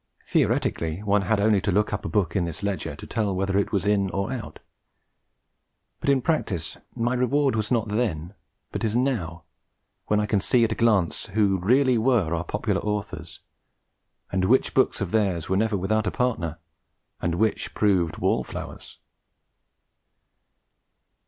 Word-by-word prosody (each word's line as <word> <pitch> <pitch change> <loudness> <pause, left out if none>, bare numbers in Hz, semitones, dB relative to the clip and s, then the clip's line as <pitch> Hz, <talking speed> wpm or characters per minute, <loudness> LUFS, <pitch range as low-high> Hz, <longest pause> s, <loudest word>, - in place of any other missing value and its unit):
Theoretically, 80 +4 0
one 105 0 +2
had 100 +2 +1
only 105 -1 +3
to 100 - 0
look 105 +3 +1
up 105 - -2
a - - -2
book 100 -5 0
in 95 -3 +1
this 85 +3 -5
ledger 100 -1 -2
to - - -10
tell 105 -4 -1
whether 95 +1 -1
it 100 - +1
was 100 -1 0
in 100 -2 +2
or 100 +7 -2
out; 120 -5 -6 1.4
but - - -1
in 135 -3 +3
practice 100 - -1 0.2
my 120 +2 0
reward 130 +1 +2
was 110 -1 -1
not 115 -3 +1
then, 100 -6 -2 0.4
but - - -4
is 110 -1 0
now, 100 -11 -1 0.6
when 105 - +2
I 105 - +1
can 105 -2 +1
see 120 +4 +3
at 115 - +1
a - - +2
glance 105 -7 +1
who 100 -2 +1
really 125 +5 +3
were 110 -9 +2
our 85 - -2
popular 105 +2 -1
authors, 105 -1 -4 0.9
and 95 0 +1
which 125 +7 +3
books 130 - +2
of 100 - -2
theirs 95 -7 0
were 95 - +2
never 110 +1 +1
without 105 +3 0
a - - 0
partner, 90 -11 -1 0.6
and 85 -1 0
which 110 +4 -1
proved 95 -6 +2
wall - - +1
flowers. - - -8
105 Hz, 165 wpm, -25 LUFS, 95-115 Hz, 1.4 s, only